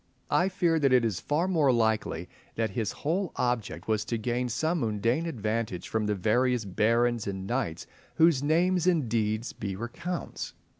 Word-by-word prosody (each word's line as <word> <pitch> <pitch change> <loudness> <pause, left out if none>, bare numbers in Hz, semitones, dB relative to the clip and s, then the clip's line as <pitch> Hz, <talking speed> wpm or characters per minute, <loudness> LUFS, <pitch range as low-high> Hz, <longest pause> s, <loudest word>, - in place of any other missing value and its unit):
I 180 +2 +3
fear 170 -3 +1
that 140 -3 +3
it 125 -2 +5
is 105 -5 -1
far 155 +5 0
more 160 -7 +3
likely 110 -7 0 0.3
that 110 -2 -1
his 110 0 -2
whole 175 +5 -2
object 120 -3 -2
was 110 -1 +1
to 115 - -2
gain 120 +2 -1
some 160 +8 0
mundane 115 +7 0
advantage 110 - -2
from 110 -1 -1
the 105 - +1
various 120 +4 +1
barons 115 +4 +1
and 95 -1 -4
knights 120 -7 -2 0.3
whose 160 -4 +4
names 175 +4 +2
and 165 -8 +3
deeds 110 0 -1
be 100 -3 -4
recounts. 120 - -5
120 Hz, 165 wpm, -28 LUFS, 110-155 Hz, 0.3 s, it